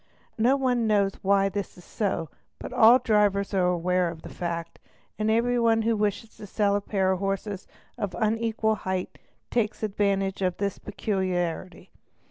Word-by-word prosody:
No 245 +5 +4
one 250 -4 +1
knows 200 -2 +3
why 195 0 +3
this 195 0 -5
is 180 - -14
so, 185 -7 -2 0.3
but - - -8
all 230 +3 +7
drivers 210 -4 +1
are 185 -2 +2
aware 180 0 +1
of 160 -1 -9
the - - -9
fact, 170 -1 -4 0.4
and 215 0 +1
every 240 +2 +2
one 225 -1 +3
who 230 0 +2
wishes 210 +1 -2
to 205 - -9
sell 200 0 +1
a 205 - 0
pair 190 -2 0
of 190 - -1
horses 195 0 -3 0.3
of 200 -3 -3
unequal 220 0 +1
height 185 -3 -4 0.3
takes 225 -3 0
advan 200 -1 +1
tage 195 0 -3
of 180 -2 0
this 200 -1 -2
peculiarity. 185 -4 -3
200 Hz, 170 wpm, -26 LUFS, 185-220 Hz, 0.4 s, all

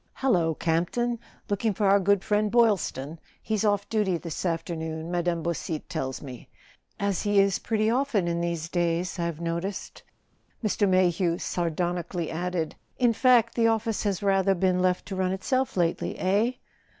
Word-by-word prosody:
" - - -42
Hallo, 170 -11 +2
Campton! 180 +10 0 0.3
Looking 205 0 0
for 210 - 0
our 200 +1 +5
good 200 0 +2
friend 210 0 +1
Boylston? 195 - +1 0.2
He's 215 -1 -1
off 205 -2 +1
duty 205 -5 +1
this 165 +2 -4
afternoon, 160 -1 -3
Mme. 175 -1 0
Beausite 170 -2 -3
tells 135 -7 -4
me; 130 -4 -10 0.5
as 200 -2 0
he 205 -1 +1
is 195 -1 +3
pretty 215 -1 0
often 235 -6 +1
in 170 0 -1
these 170 -2 -2
days, 175 +1 -1
I've 170 -2 -2
no¬ 170 0 -2
ticed," 195 +1 -6 0.6
Mr. 205 -1 +1
Mayhew 180 -2 +2
sardonically 175 0 -2
added. 175 -1 -2
" - - -42
In 230 - +3
fact, 235 -1 +4
the 230 -1 +3
office 225 -1 0
has 200 -2 -1
rather 195 -1 +3
been 185 0 +1
left 180 0 +1
to 195 - -5
run 185 0 0
itself 255 +5 -1
lately—eh? 190 +6 +1
185 Hz, 160 wpm, -26 LUFS, 170-205 Hz, 0.6 s, our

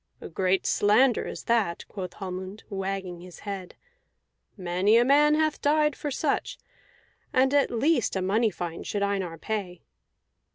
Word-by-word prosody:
"A - - -9
great 185 +2 0
slander 230 +5 +3
is - - -7
that," 220 -8 0
quoth 185 -3 -6
Hallmund, 190 +1 -7
wagging 190 -2 -4
his 180 -1 -12
head. 195 -3 -6 0.8
"Many 185 +4 +2
a 240 - +4
man 295 +3 +5
hath 310 -1 0
died 300 -1 +2
for 295 - -4
such; 275 - -1 0.7
and 265 +1 +3
at 285 -1 +3
least 245 +1 +1
a 190 - 0
money 215 +4 +2
fine 175 -3 -6
should 205 -1 -2
Einar 190 -4 -2
pay." 185 -2 -4
200 Hz, 150 wpm, -26 LUFS, 185-255 Hz, 0.8 s, man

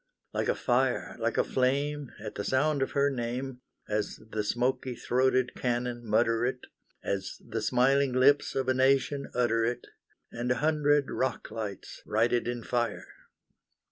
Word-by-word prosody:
Like - - -1
a - - +2
fire, - - 0
like - - -1
a - - +4
flame, 140 +2 0
At 105 0 -6
the 100 - -4
sound 140 +5 +1
of 135 - -1
her 140 0 +3
name, 125 +1 -4 0.3
As 105 0 -1 0.2
the 105 -1 -1
smoky 125 +3 -1
throated 130 +1 +1
cannon 120 -1 -2
mutter 115 +1 +2
it, 125 +1 -2 0.4
As 95 -1 -3
the 115 -1 -3
smiling 130 +4 +3
lips 140 +3 +4
of 135 -1 0
a 130 - +3
nation 135 +2 +2
utter 115 -2 +2
it, 120 +1 -1 0.5
And 120 +1 -3
a - - +3
hundred 145 0 +2
rock 130 - -2
lights 105 -4 -6
write 115 +3 +2
it 120 - +1
in 120 -1 -3
fire! 120 -2 -1
125 Hz, 160 wpm, -29 LUFS, 115-135 Hz, 0.5 s, a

